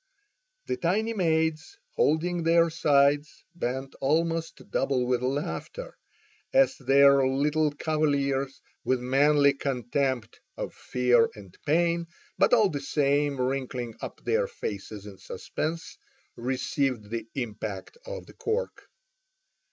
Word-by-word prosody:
The 375 - -2
tiny 220 - 0
maids, 160 - 0 0.2
holding 170 +3 +1
their 165 0 +4
sides, 145 -2 +2
bent 130 -4 -3
almost 165 +3 -1
double 135 -2 +1
with 125 -1 +1
laughter, 150 - -4 0.6
as 270 0 +4
their 140 0 +5
little 150 +3 +2
cavaliers 140 -3 0 0.2
with 130 -1 +1
manly 140 +3 +4
contempt 130 -2 -2 0.2
of - - -4
fear 125 -2 +2
and 100 -4 -13
pain, 170 +2 +2 0.3
but - - +4
all 220 -5 +5
the 145 -4 -4
same 145 0 +1
wrinkling 125 -2 -2
up - - -7
their 485 +2 +1
faces 105 - -6
in 100 -2 -11
suspense, 155 - -5 0.4
received 125 -2 -2
the 115 -1 -4
impact 110 -6 -5
of - - -7
the - - -15
cork. 465 +3 -3
140 Hz, 115 wpm, -27 LUFS, 125-165 Hz, 0.6 s, their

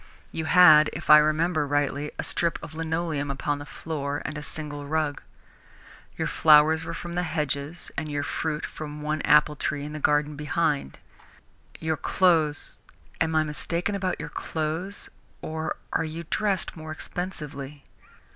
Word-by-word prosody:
You 160 - -3
had, 155 -3 +7
if 155 0 0
I 150 - +11
remember 155 0 +1
rightly, 145 0 0
a - - -2
strip 170 -1 0
of 160 - -8
linoleum 160 -2 -2
upon 145 +1 -2
the 145 - -9
floor, 145 0 -4
and 155 - -4
a 150 - -5
single 145 -1 -4
rug. 155 -1 -1 1.0
Your - - -1
flowers 155 +1 +5
were - - -5
from 175 -1 -6
the 175 - 0
hedges 150 -1 -1
and 155 -1 -3
your 145 -1 -2
fruit 155 +1 -2
from 150 -1 -7
the 150 - -8
one 155 0 -1
apple 150 0 +4
tree 145 0 -2
in 150 - -7
the 155 - -5
garden 150 0 +2
behind. 150 - -1 0.8
Your 160 -1 -1
clothes 160 -6 +1 0.4
am 160 -1 +1
I 155 - +4
mistaken 170 +5 -2
about 190 -2 -2
your - - -5
clothes 165 +5 -3 0.3
or 160 0 -3 0.2
are - - +1
you 160 +2 -6
dressed 200 -4 0
more 155 -1 -8
expensively?" 150 -5 -6
155 Hz, 160 wpm, -26 LUFS, 145-165 Hz, 1.0 s, I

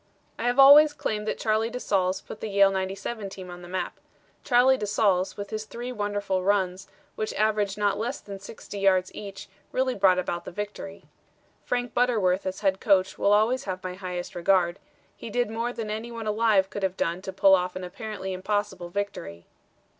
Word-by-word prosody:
"I 230 - -2
have 245 +1 +1
always 290 +2 +9
claimed 215 -7 -3
that - - -1
Charlie 220 0 +1
de 250 +1 -5
Saulles 190 -4 0
put - - -10
the - - -3
Yale 200 -1 +5
'97 195 +3 -3
team 185 -2 -9
on 175 0 -9
the 175 - -10
map. 180 0 -4 0.4
Charlie 255 +1 +5
de 210 -5 -4
Saulles, 190 -2 +1
with 200 0 -6
his 215 0 -4
three 240 +3 -6
wonderful 205 -4 -1
runs, 190 -1 0 0.3
which 215 - -4
averaged 210 -2 +1
not 205 -1 +1
less 240 +5 -2
than 200 -1 -9
60 200 0 -9
yards 185 -2 +2
each, 200 -2 -8 0.2
really 260 0 +1
brought 190 -3 +4
about 175 -1 -2
the - - -7
victory. 205 0 -6 0.6
"Frank 245 -1 -2
Butterworth 205 -7 +2
as 185 +1 -4
head 190 -2 +1
coach 190 -2 +2
will 200 - +3
always 220 +5 +3
have 185 -2 -4
my 185 0 -4
highest 180 -1 -5
regard; 175 0 +2 0.4
he - - -8
did 240 0 0
more 230 +2 -2
than 225 -3 -5
any 220 +2 -5
one 230 -1 -6
alive 210 -3 +2
could 205 - -5
have 190 -1 -1
done 170 +2 -1
to 190 - -6
pull 195 0 +5
off 180 -1 +2
an 185 - -5
apparently 190 +1 -6
impossible 190 -1 -2
victory." 175 - -5
200 Hz, 195 wpm, -26 LUFS, 185-220 Hz, 0.6 s, always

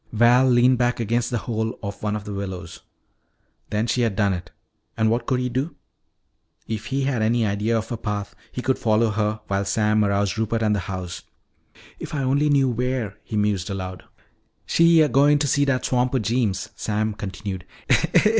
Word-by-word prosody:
Val 120 +3 +5
leaned 125 +1 +4
back 120 0 +1
against 115 +2 0
the 120 - -1
hole 110 -1 -2
of 100 0 -6
one 105 0 -1
of 105 - -4
the 105 - -6
willows. 95 -4 -6 0.9
Then 105 +1 0
she 120 +1 0
had 115 -4 +1
done 100 -1 +2
it! 90 -1 -6 0.5
And 110 -1 +2
what 120 +1 -1
could 130 -2 +1
he 125 - -1
do? 130 +6 -2 0.9
If 110 0 -4
he 135 +1 -1
had 135 -4 0
any 115 +1 +2
idea 105 +3 0
of 110 - -4
her 120 - -3
path, 105 -2 -4 0.2
he 125 - -5
could 130 - +1
follow 110 0 +2
her 105 0 -1
while 100 0 -1
Sam 105 +1 +2
aroused 100 +1 0
Rupert 110 +1 0
and 105 -1 +2
the - - 0
house. 90 -2 -5 0.8
"If - - -6
I 140 - -1
only 140 +3 +2
knew 140 -2 +4
where 125 -3 -2
" - - -40
he 110 - -4
mused 105 -3 0
aloud. 95 -2 -5 0.6
"She 165 -1 +5
a 155 - +5
goin' 145 +1 +4
to 145 - 0
see 145 +1 +2
dat 135 -2 0
swamper 125 +1 +1
Jeems," 105 -3 0
Sam 110 0 -1
continued. 95 -2 -6
110 Hz, 190 wpm, -23 LUFS, 105-125 Hz, 0.9 s, Val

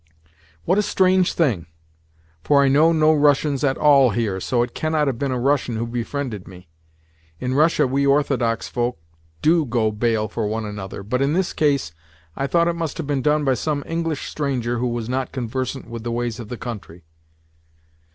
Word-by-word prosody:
"What 185 +4 +3
a - - +4
strange 185 -2 +2
thing! 115 - 0 0.8
For 140 -1 +4
I 135 - +3
know 155 +4 +5
no 155 -1 +4
Russians 145 -1 +2
at 135 -2 +1
all 140 -4 +5
here, 105 -3 -1
so 120 +5 +1
it 120 - -6
cannot 155 -1 0
have 130 -5 -2
been 140 -2 -1
a 125 - -1
Russian 135 -2 +1
who 115 +1 -2
befriended 120 -2 -4
me. 90 -2 -13 0.7
In 125 0 -2
Russia 155 +4 +3
we 140 +2 +1
Orthodox 135 -5 +1
folk 120 0 -2 0.5
do 165 +1 +4
go 120 -4 0
bail 110 0 0
for 110 +1 -3
one 110 +1 -3
another, 105 -2 -7
but 125 +6 -1
in 140 +2 +2
this 185 +1 0
case 140 - +1 0.4
I 135 - -2
thought 170 +3 +2
it 170 - +1
must 165 -3 -4
have 165 - -4
been 140 -2 -1
done 150 +2 +2
by 135 - +3
some 145 +3 -2
English 165 -3 -3
stranger 125 -5 -2
who 125 - 0
was 120 -2 -3
not 130 +1 -2
conversant 130 +1 -4
with 115 -1 -7
the 120 - -3
ways 120 0 -2
of 110 -3 -8
the 125 - -5
country." 100 -8 -8
130 Hz, 190 wpm, -22 LUFS, 115-150 Hz, 0.8 s, know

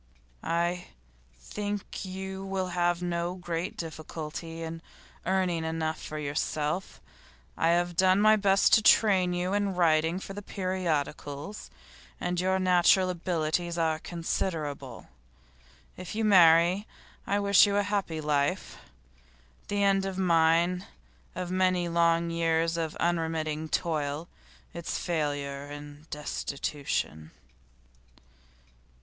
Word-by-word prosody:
'I 170 +1 -1 0.5
think 205 - -5
you 190 +1 -6
will 190 -1 -2
have 175 0 0
no 175 0 -2
great 175 -1 -4
difficulty 165 0 -6
in 165 0 -6 0.5
earning 185 -3 +1
enough 160 0 -2
for 155 - -6
yourself. 150 +3 -2 0.6
I 165 - +1
have 175 +1 +2
done 185 +1 +4
my 215 +1 +6
best 195 -2 +3
to 220 - +7
train 195 -4 +5
you 180 +2 -1
in 200 -2 0
writing 165 0 +2
for 195 - -8
the 205 - -6
periodicals, 175 -3 -3 0.5
and 175 0 -1
your 190 +1 +2
natural 185 0 +4
abilities 170 -1 -1
are 160 -1 +1
considerable. 155 -7 -4 0.9
If 185 +2 -7
you 220 0 0
marry, 180 0 +5 0.4
I 200 - +1
wish 200 0 +6
you 200 - 0
a 205 - +3
happy 200 -6 -2
life. 145 -1 -1 0.9
The 205 0 0
end 195 -1 +3
of 190 -1 -5
mine, 170 +1 +3 0.5
of 180 -1 -4
many 185 -1 +2
long 170 0 +2
years 165 0 +1
of 160 -2 -3
unremitting 160 -2 -1
toil, 155 -1 -1 0.5
is 170 0 -4
failure 145 -4 -2
and 145 +1 -10
destitution. 140 - -3
170 Hz, 115 wpm, -28 LUFS, 160-185 Hz, 0.9 s, to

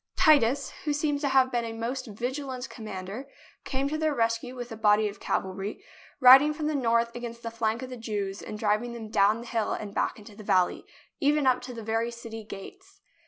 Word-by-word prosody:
Titus, 280 -5 +4
who 300 - +1
seems 290 -1 0
to 290 - +1
have 265 -1 +4
been 240 -1 0
a 230 -1 -4
most 240 +4 -4
vigilant 255 +4 -4
commander, 215 +3 -7 0.4
came 270 0 -1
to 310 +2 -2
their 310 -2 +1
rescue 230 +1 0
with 245 -1 -7
a - - -5
body 210 0 +4
of 200 0 -7
cavalry, 195 +2 -3 0.4
riding 270 +4 +8
from 305 -1 -3
the 305 - 0
north 235 -3 +1
against 235 -1 -7
the 230 - -4
flank 230 +1 -1
of 255 - -7
the 250 - -6
Jews 205 -3 -3
and 210 - -7
driving 215 +3 0
them 225 -2 -7
down 210 +2 +3
the - - -9
hill 225 -2 -1
and 205 -2 -5
back - - 0
into 210 -1 -13
the 215 - -10
valley, 185 -3 +1 0.3
even 295 -1 +2
up 255 -1 +3
to 250 0 -7
the 225 - -7
very 225 +2 0
city 230 -1 -8
gates. 380 - -11
235 Hz, 210 wpm, -28 LUFS, 215-265 Hz, 0.4 s, riding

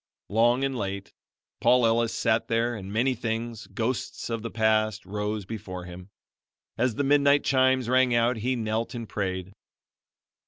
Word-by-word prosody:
Long 120 +5 +3
and 135 -1 -1
late, 100 -3 -4 0.5
Paul 125 0 +4
Ellis 115 0 +2
sat 115 0 +1
there 115 +1 +1
and 100 -3 -7
many 125 +5 +2
things, 115 -1 -4
ghosts 120 0 -3
of 115 -1 -2
the 115 - -4
past, 110 -2 +1
rose 105 +1 -3
before 95 -4 -6
him. 90 +1 -10 0.7
As 120 -1 0
the 145 - 0
midnight 140 0 +4
chimes 130 -2 +2
rang 130 0 +3
out 120 +1 +2
he 125 +4 -1
knelt 115 +1 -2
and 115 -2 -5
prayed. 95 -2 -3
115 Hz, 155 wpm, -26 LUFS, 105-125 Hz, 0.7 s, Paul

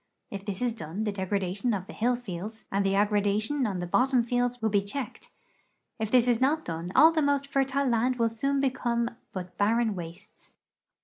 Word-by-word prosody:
If 195 -1 -6
this 200 +2 -4
is 240 -2 +1
done 195 -1 -5
the 210 - 0
degradation 200 +3 -1
of 185 -2 -5
the - - -10
hill 245 +3 +1
fields 215 -2 -7
and 195 +1 +1
the 195 0 +1
aggradation 210 +6 +1
on 195 -3 -2
the 175 - -3
bottom 250 +7 +2
fields 245 +1 0
will 220 -2 0
be 200 -1 +3
checked; 240 +7 -6 0.7
if 220 -1 -1
this 250 +1 +4
is 240 -1 +2
not 300 +4 +2
done 165 +1 -4
all 315 +4 +8
the 320 -1 +1
most 285 -1 +1
fertile 275 0 0
land 245 +1 +2
will 230 -2 +1
soon 275 +5 -1
become 240 -3 0 0.2
but 180 -1 -7
barren 225 +2 +2
wastes. 180 +4 -10
225 Hz, 195 wpm, -28 LUFS, 200-250 Hz, 0.7 s, all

